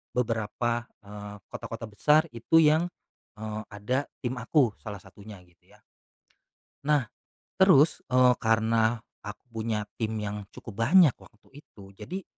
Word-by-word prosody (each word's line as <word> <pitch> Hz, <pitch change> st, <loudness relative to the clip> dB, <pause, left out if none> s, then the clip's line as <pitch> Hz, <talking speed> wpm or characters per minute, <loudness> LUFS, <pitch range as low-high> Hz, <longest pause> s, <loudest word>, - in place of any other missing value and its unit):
beberapa, 120 Hz, 0 st, -1 dB, 0.2 s
eee, 105 Hz, 0 st, -9 dB, 0.2 s
kota-kota 115 Hz, 0 st, -6 dB
besar 150 Hz, +9 st, +4 dB
itu 115 Hz, +7 st, -1 dB
yang, 155 Hz, +3 st, +4 dB, 0.5 s
eee, 110 Hz, 0 st, -5 dB
ada 125 Hz, +7 st, -2 dB, 0.2 s
tim 125 Hz, +1 st, -2 dB
aku 125 Hz, -1 st, +2 dB
salah 105 Hz, -3 st, -7 dB
satunya 100 Hz, 0 st, -13 dB
gitu 90 Hz, -1 st, -29 dB
ya. -, -, -22 dB, 1.0 s
Nah, 145 Hz, -5 st, +2 dB, 0.5 s
terus, 165 Hz, -5 st, +5 dB
eee, 125 Hz, 0 st, +5 dB
karena, 115 Hz, +1 st, +2 dB, 0.2 s
aku 105 Hz, +4 st, -9 dB
punya 110 Hz, -1 st, -2 dB, 0.2 s
tim 110 Hz, 0 st, -1 dB
yang 105 Hz, -1 st, -5 dB
cukup 110 Hz, -1 st, -10 dB
banyak 155 Hz, +3 st, +6 dB
waktu 135 Hz, +7 st, -18 dB
itu 100 Hz, -8 st, -16 dB
jadi, 185 Hz, -, -7 dB
115 Hz, 130 wpm, -27 LUFS, 105-130 Hz, 1.0 s, banyak